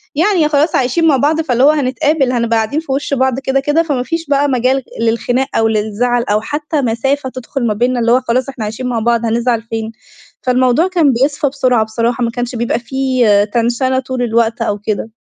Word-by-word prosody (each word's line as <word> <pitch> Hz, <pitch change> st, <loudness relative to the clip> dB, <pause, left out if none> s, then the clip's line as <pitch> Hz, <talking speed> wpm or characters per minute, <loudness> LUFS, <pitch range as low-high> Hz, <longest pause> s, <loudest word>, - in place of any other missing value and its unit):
يعني 340 Hz, 0 st, +2 dB
خلاص 300 Hz, +2 st, +1 dB
عايشين 265 Hz, +6 st, +1 dB
مع 290 Hz, -4 st, +4 dB
بعض 305 Hz, +5 st, +1 dB
فاللي 255 Hz, -5 st, 0 dB
هو 285 Hz, -, +7 dB
هنتقابل، 280 Hz, 0 st, 0 dB
هنبقى 235 Hz, -2 st, 0 dB
قاعدين 220 Hz, +7 st, -1 dB
في 320 Hz, -4 st, -7 dB
وش 280 Hz, +1 st, -2 dB
بعض 260 Hz, -1 st, +1 dB
كده 270 Hz, 0 st, 0 dB
كده، 295 Hz, +4 st, +1 dB
فما 285 Hz, -6 st, -1 dB
فيش 330 Hz, +4 st, -3 dB
بقى 285 Hz, 0 st, +2 dB
مجال 260 Hz, +1 st, +1 dB, 0.2 s
للخناق 235 Hz, +3 st, 0 dB
أو 225 Hz, -, +3 dB
للزعل 220 Hz, +3 st, 0 dB
أو 210 Hz, -2 st, 0 dB
حتى 295 Hz, +4 st, -2 dB
مسافة 260 Hz, +3 st, -1 dB
تدخل 255 Hz, 0 st, -4 dB
ما 215 Hz, -, +1 dB
بينّا، 245 Hz, +3 st, 0 dB
اللي 230 Hz, 0 st, +1 dB
هو 250 Hz, +2 st, +4 dB
خلاص 255 Hz, +2 st, -1 dB
إحنا 265 Hz, -5 st, -6 dB
عايشين 220 Hz, +4 st, -4 dB
مع 240 Hz, -2 st, -1 dB
بعض 235 Hz, +1 st, +1 dB
هنزعل 235 Hz, +1 st, 0 dB
فين. 225 Hz, -1 st, -5 dB, 0.5 s
فالموضوع 255 Hz, +5 st, +2 dB
كان 335 Hz, -7 st, +2 dB
بيصفى 280 Hz, +4 st, 0 dB
بسرعة 255 Hz, -4 st, +1 dB
بصراحة، 230 Hz, +2 st, -1 dB
ما 230 Hz, -, 0 dB
كانش 245 Hz, +1 st, -4 dB
بيبقى 235 Hz, 0 st, -1 dB
في 260 Hz, 0 st, 0 dB, 0.3 s
تنشنة 245 Hz, +3 st, +1 dB
طول 260 Hz, -1 st, -4 dB
الوقت 230 Hz, 0 st, 0 dB
أو 210 Hz, -2 st, -1 dB
كده. 215 Hz, +1 st, -3 dB
255 Hz, 200 wpm, -15 LUFS, 235-275 Hz, 0.5 s, هو